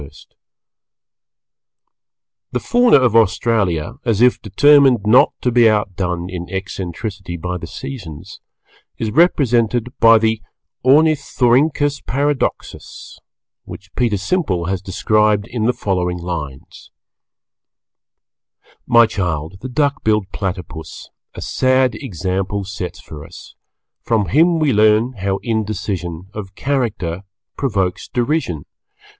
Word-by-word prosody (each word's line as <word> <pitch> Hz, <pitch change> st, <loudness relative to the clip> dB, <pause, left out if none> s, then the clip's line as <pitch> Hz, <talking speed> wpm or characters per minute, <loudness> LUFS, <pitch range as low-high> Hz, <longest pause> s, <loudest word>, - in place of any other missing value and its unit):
The -, -, 0 dB
Fauna 245 Hz, -4 st, +4 dB
of 120 Hz, -3 st, +2 dB
Australia, 110 Hz, -, +1 dB
as 115 Hz, -5 st, 0 dB
if 125 Hz, +1 st, +3 dB
determined 130 Hz, +1 st, +4 dB
not 115 Hz, +4 st, +5 dB
to 125 Hz, -, 0 dB
be 120 Hz, -1 st, +5 dB
outdone 90 Hz, -4 st, -2 dB
in 90 Hz, -1 st, -7 dB
eccentricity 95 Hz, 0 st, -5 dB
by 90 Hz, +2 st, -4 dB
the 85 Hz, -, -8 dB
Seasons, 95 Hz, -, -9 dB, 0.6 s
is 110 Hz, -1 st, -3 dB
represented 125 Hz, -6 st, +2 dB
by 115 Hz, 0 st, +7 dB
the 110 Hz, 0 st, 0 dB, 0.4 s
Ornithorynchus 145 Hz, 0 st, +2 dB
Paradoxus, 145 Hz, +1 st, -3 dB, 0.5 s
which 100 Hz, +1 st, -11 dB
Peter 115 Hz, -4 st, 0 dB
Simple 95 Hz, -, -1 dB
has 95 Hz, 0 st, -2 dB
described 105 Hz, +1 st, +1 dB
in 115 Hz, -3 st, -3 dB
the -, -, +4 dB
following 90 Hz, -6 st, -2 dB
lines 85 Hz, -6 st, -7 dB, 2.0 s
My 120 Hz, -1 st, +6 dB
child, 90 Hz, -5 st, -3 dB
the 130 Hz, -, -6 dB
Duck 145 Hz, +3 st, 0 dB
billed 105 Hz, -3 st, 0 dB
Platypus 90 Hz, -4 st, -6 dB, 0.2 s
A -, -, -7 dB
sad 130 Hz, -1 st, +2 dB
example 95 Hz, -, -3 dB
sets 95 Hz, -2 st, -6 dB
for 75 Hz, -2 st, -10 dB
us. 85 Hz, +2 st, -13 dB, 0.5 s
From 105 Hz, -6 st, 0 dB
him 165 Hz, -, +4 dB
we 155 Hz, -4 st, +1 dB
learn 110 Hz, +4 st, +3 dB
how 100 Hz, -3 st, -2 dB
indecision 100 Hz, -6 st, -3 dB
Of 100 Hz, -3 st, -8 dB
character 110 Hz, -11 st, -2 dB, 0.3 s
provokes 100 Hz, -9 st, -2 dB
derision. 120 Hz, -, -2 dB
105 Hz, 110 wpm, -18 LUFS, 90-125 Hz, 2.0 s, by